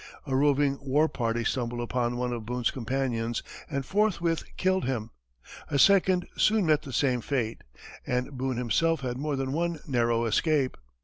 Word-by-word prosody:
A 135 -3 -1
roving 140 0 +2
war 145 +3 +2
party 115 -4 -1
stumbled 120 -1 -2
upon 120 0 -1
one 125 0 -1
of 115 -2 -4
Boone's 120 +1 -1
companions, 120 -2 -2 0.3
and 140 -3 -2
forthwith 180 -5 +1
killed 185 -2 +1
him; 115 -4 -2 0.6
a 140 - 0
second 185 +2 +4
soon 215 -3 +3
met 155 -2 +3
the 140 - -9
same 125 -2 +1
fate, 120 -5 -2 0.4
and 125 +2 -1
Boone 130 -1 -2
himself 145 +7 +1
had 125 -1 -3
more 150 0 -1
than 135 0 -2
one 170 0 -1
narrow 120 -3 +1
escape. 135 +4 +1
130 Hz, 165 wpm, -28 LUFS, 120-155 Hz, 0.6 s, second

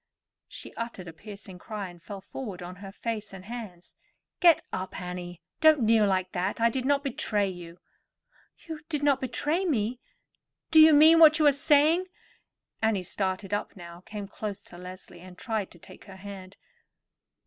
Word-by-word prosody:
She - - -9
uttered 230 -6 -6
a 165 - -8
piercing 200 0 -11
cry, 210 0 -6
and 175 -1 -15
fell 195 +2 -8
forward 200 -4 -7
on 180 +1 -8
her 195 0 -9
face 215 -1 -5
and 190 -1 -10
hands. 210 -6 -9 0.5
"Get 340 -3 +6
up, 185 0 -4
Annie; 180 -1 -7 0.2
don't 315 -3 +6
kneel 220 -1 +4
like 185 -1 0
that. 185 +5 -2
I 230 0 +3
did 255 +1 -3
not 280 0 +2
betray 215 -6 0
you." 175 -2 -8 0.9
"You 320 -2 -6
did 295 -3 -2
not 280 -2 +3
betray 295 +7 -1
me? 245 - -1 0.7
Do 315 -1 +8
you 310 -1 +8
mean 320 +3 +7
what 310 -1 +8
you 310 - +2
are 290 - +8
saying?" 300 +6 +3 0.7
Annie 220 -4 +1
started 190 +1 -3
up 205 - -3
now, 170 -2 -11
came 205 -1 -7
close 205 0 -5
to 175 - -14
Leslie, 180 -1 -10
and 180 0 -13
tried 220 -2 -3
to - - -16
take - - -15
her 195 -3 -12
hand. 190 -1 -10
205 Hz, 175 wpm, -27 LUFS, 185-270 Hz, 0.9 s, Do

